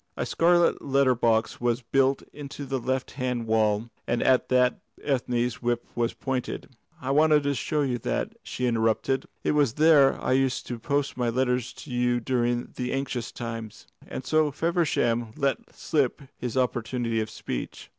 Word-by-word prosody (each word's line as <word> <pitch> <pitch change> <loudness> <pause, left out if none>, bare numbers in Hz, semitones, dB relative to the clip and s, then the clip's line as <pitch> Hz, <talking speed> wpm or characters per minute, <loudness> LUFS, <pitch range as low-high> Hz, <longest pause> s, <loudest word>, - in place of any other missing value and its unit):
A - - -1
scarlet 175 +1 +3
letter 135 -2 +3
box 115 -1 +1
was 120 +1 0
built 135 +3 +2
into 145 -1 -7
the 135 0 -2
left 130 +1 -2
hand 125 -3 -2
wall, 110 0 +1 0.2
and 120 0 +1
at 130 -1 +3
that 125 -1 +3 0.2
Ethne's 125 -3 0
whip 120 -1 0
was 120 0 0
pointed. 130 -2 -3 0.3
"I 130 - -3
wanted 150 +1 +4
to 140 0 +1
show 150 +3 -1
you 125 -3 -1
that," - - -2
she 125 - -4
interrupted. 115 +3 +1 0.2
"It - - +2
was 145 -6 +2
there 150 -2 +5
I - - -1
used 130 0 +1
to 120 -2 -5
post 140 +2 -1
my 120 -1 +1
letters 125 0 0
to 145 - -11
you 120 0 +1
during 120 0 0
the 125 0 -2
anxious 135 -3 -3
times." 115 -2 -7 0.2
And 130 - -6
so 155 0 +3
Feversham 140 -8 0
let 140 -1 +1 0.2
slip 140 -2 0
his 125 +1 -4
opportunity 120 -2 0
of 110 - -4
speech. 65 - -6
125 Hz, 165 wpm, -26 LUFS, 120-140 Hz, 0.3 s, there